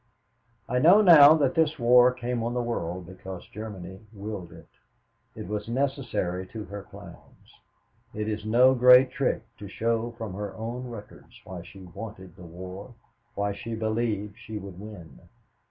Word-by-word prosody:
"I 125 +1 0
know 175 +9 +7
now 155 -5 +9
that 140 -4 +1
this 160 -1 +1
war 125 0 +6
came 125 -1 -3
on 120 +2 -2
the 125 - 0
world 90 -6 -4
because 95 0 -9
Germany 95 -3 -8
willed 100 -4 -7
it. 80 0 -14 0.7
It - - -7
was 105 +2 -4
necessary 120 -9 -2
to 110 +1 -8
her 100 +2 -7
plans. - - -15 0.6
It 105 0 -4
is 105 -1 -3
no 120 +4 +5
great 125 +1 +7
trick 130 -4 -1 0.2
to 105 - -8
show 115 +3 -1
from 110 -5 -6
her 100 0 -6
own 120 +4 -5
records 115 -4 -12
why 90 -2 -8
she 95 +3 -13
wanted 95 -1 -10
the 90 - -15
war, 95 +6 -10 0.4
why 100 0 -1
she 110 +3 -6
believed 110 -2 -2
she 110 0 -7
would 95 -3 -9
win. 90 - -11
110 Hz, 160 wpm, -26 LUFS, 95-125 Hz, 0.7 s, now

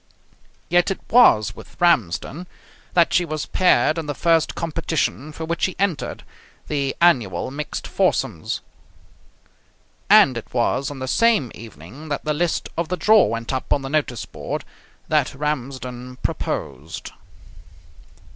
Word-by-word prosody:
Yet 175 +2 +3
it 195 - -2
was 110 - +5
with - - -14
Ramsden 165 - +1 0.5
that 170 -2 +4
she 180 - +4
was 155 -2 -3
paired 165 -3 +3
in 160 - -5
the 145 - -3
first 165 +1 +2
competition 160 -3 -2
for 160 +1 -6
which 170 +1 -3
she 185 - 0
entered, 190 -6 -2 0.4
the 140 -2 -1
annual 125 - +2
mixed 150 +2 -5
foursomes. - - -1 1.5
And 130 -3 +6
it - - -15
was 130 +3 +1
on 145 - -7
the 130 0 -5
same 225 - +3
evening 115 - -11
that 145 - -3
the 155 - +1
list 170 +2 -1
of 170 0 -1
the 180 - -1
draw 215 +2 +5
went 115 +4 -3
up 130 - -4
on 140 - +2
the 135 - -5
notice 145 -6 -1
board - - -5 0.4
that - - +1
Ramsden 130 -3 -4
proposed. 70 +5 -4
150 Hz, 140 wpm, -22 LUFS, 125-170 Hz, 1.5 s, And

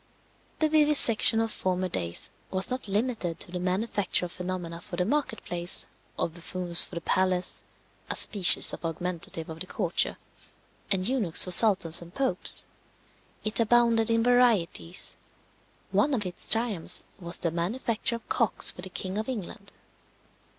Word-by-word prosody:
The 315 - +1
vivisection 295 -8 +6
of 225 -1 -2
former 185 -1 -3
days 90 - -4 0.2
was 190 +5 +2
not 255 -3 -4
limited 205 -4 -3
to - - -6
the 180 - -5
manufacture 185 +1 -3
of 175 - -9
phenomena 175 -2 -7
for 175 - -10
the 180 +1 -2
market 275 -1 -3
place, 175 0 +1 0.3
of 165 - -4
buffoons 175 0 -1
for - - -10
the 170 - -6
palace 185 +1 -1 0.5
(a - - -3
species 195 -5 +7
of - - -10
augmentative 165 -1 -6
of 160 0 -10
the 185 - -6
courtier), - - -1 0.7
and 190 -1 +1
eunuchs 230 -10 +3
for 180 - -1
sultans 180 -4 +4
and 170 +1 -15
popes. 260 -10 +2 0.8
It 215 +2 -1
abounded 230 0 +2
in 230 0 0
varieties. 230 -8 0 0.7
One 285 -1 0
of 210 -5 -4
its 180 - -5
triumphs 225 -6 0 0.2
was 170 -1 -2
the 170 - -3
manufacture 220 +7 -3
of 230 - -12
cocks 230 -4 +2
for - - -12
the 190 - -6
king 185 +2 -6
of 220 - -6
England. 205 -3 -8
190 Hz, 155 wpm, -26 LUFS, 175-230 Hz, 0.8 s, species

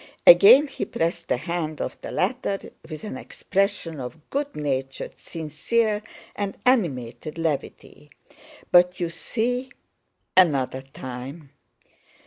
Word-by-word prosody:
Again 400 - +9
he 275 - -4
pressed 170 -4 -2
the - - +1
hand 155 +1 -3
of - - -3
the - - -6
latter 245 -6 -1 0.2
with 155 -2 -7
an 215 - -5
expression 185 -5 -2
of 135 +5 -8
good 285 +1 -2
natured, 135 -2 -3
sincere, 210 +8 -1 0.3
and 200 -1 -3
animated 155 - 0
levity. 150 -2 -4 0.6
"But 180 0 +5
you 170 -2 -1
see... 245 +8 -2 0.7
another 140 -7 +3
time!" 135 +2 -8
170 Hz, 115 wpm, -24 LUFS, 145-210 Hz, 0.7 s, Again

